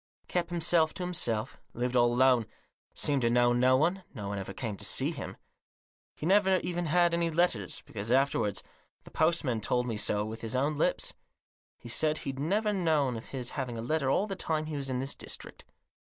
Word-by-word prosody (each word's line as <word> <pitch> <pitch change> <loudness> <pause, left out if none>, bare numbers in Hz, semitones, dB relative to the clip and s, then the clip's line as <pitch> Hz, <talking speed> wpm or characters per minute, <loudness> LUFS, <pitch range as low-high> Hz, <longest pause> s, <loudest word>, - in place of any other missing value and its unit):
Kept 175 -1 -1
himself 170 -2 +2
to 185 - -4
himself; 120 -10 -2
lived 125 +1 -2
all 120 -1 +5
alone; 125 -2 +4 0.5
seemed 140 -2 +1
to 115 - +3
know 120 0 +4
no 130 +1 +4
one; 175 +6 +1
no 105 -4 -5
one 100 0 -3
ever 95 - -6
came 115 -7 -4
to - - -8
see - - +1
him. - - -7 0.8
He - - -6
never 190 +1 +4
even 175 0 -2
had 175 +2 +3
any 170 0 +1
letters; 155 - 0
because, 105 +1 -5
afterwards, 130 -6 +2 0.4
the - - -14
post 165 +2 +2
man 120 -6 -1
told 125 +3 +1
me 115 -3 -3
so 105 0 +1
with 110 +1 -6
his 115 +2 -3
own 140 +4 +1
lips; 145 - 0 0.6
he - - -12
said 155 +6 +1
he'd 135 -2 -5
never 210 +8 +1
known 155 -9 +1
of 115 - -7
his 125 -2 -4
having 125 -4 -4
a - - -3
letter 145 +1 0
all 190 +9 +2
the 195 -2 -4
time 155 -3 -1
he 155 -1 -5
was 140 -1 -3
in 130 - -1
this 135 +2 -2
district. - - -8
135 Hz, 205 wpm, -30 LUFS, 120-170 Hz, 0.8 s, all